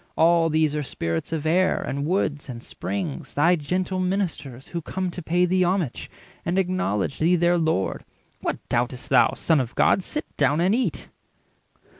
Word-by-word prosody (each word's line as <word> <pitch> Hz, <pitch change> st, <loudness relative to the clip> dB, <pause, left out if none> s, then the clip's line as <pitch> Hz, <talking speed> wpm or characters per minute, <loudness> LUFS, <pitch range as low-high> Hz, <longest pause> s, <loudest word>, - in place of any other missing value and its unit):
All 165 Hz, 0 st, +4 dB
these 155 Hz, -1 st, +2 dB
are 150 Hz, -, 0 dB
Spirits 85 Hz, -, -3 dB
of 160 Hz, -2 st, -2 dB
air, 185 Hz, +4 st, +3 dB
and 140 Hz, +2 st, -3 dB
woods, 155 Hz, -6 st, -1 dB
and 120 Hz, -1 st, -7 dB
springs, 185 Hz, -8 st, -5 dB
Thy 165 Hz, +5 st, +4 dB
gentle 180 Hz, +4 st, -2 dB
ministers, 180 Hz, -9 st, -2 dB
who 170 Hz, -, -4 dB
come 185 Hz, +3 st, -3 dB
to 180 Hz, -, -7 dB
pay 175 Hz, +2 st, +2 dB
Thee 185 Hz, +1 st, +2 dB
homage, 180 Hz, -6 st, -1 dB, 0.3 s
and 175 Hz, +2 st, -1 dB
acknowledge 180 Hz, -, 0 dB
thee 170 Hz, +3 st, +4 dB
their 175 Hz, 0 st, +3 dB
Lord. 160 Hz, -, 0 dB, 0.4 s
What -, -, -4 dB
doubt'st 125 Hz, +3 st, -1 dB
thou, 135 Hz, -, +5 dB
Son 160 Hz, -3 st, +2 dB
of 125 Hz, -2 st, -3 dB
God? -, -, +4 dB
Sit 300 Hz, -, -4 dB
down 145 Hz, +2 st, +2 dB
and 185 Hz, +4 st, +3 dB
eat." 235 Hz, -, -1 dB
165 Hz, 170 wpm, -24 LUFS, 145-185 Hz, 0.4 s, thou